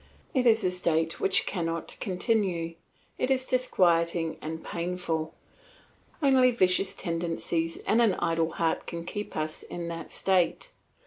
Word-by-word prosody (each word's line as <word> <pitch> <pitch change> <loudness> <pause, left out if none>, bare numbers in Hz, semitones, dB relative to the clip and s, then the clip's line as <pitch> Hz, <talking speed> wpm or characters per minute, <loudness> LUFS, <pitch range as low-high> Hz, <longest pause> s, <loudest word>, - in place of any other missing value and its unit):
It 255 -2 +2
is 225 -2 +5
a 185 - +2
state 165 -2 +1
which 190 - +3
cannot 165 -3 -3
continue, 185 -4 0 0.5
it 255 - 0
is 260 -1 +1
disquieting 170 -10 +1
and 160 +1 -5
painful; 170 -2 -3 0.9
only 260 -2 +5
vicious 190 -3 +3
tendencies 165 -1 -2
and 225 +2 +3
an 215 -6 +4
idle 165 -1 0
heart 165 -1 -1
can 170 -1 -5
keep 205 +3 -5
us 155 0 -3
in 170 -1 -6
that 165 -1 -7
state. 190 - +1
175 Hz, 135 wpm, -28 LUFS, 165-205 Hz, 0.9 s, is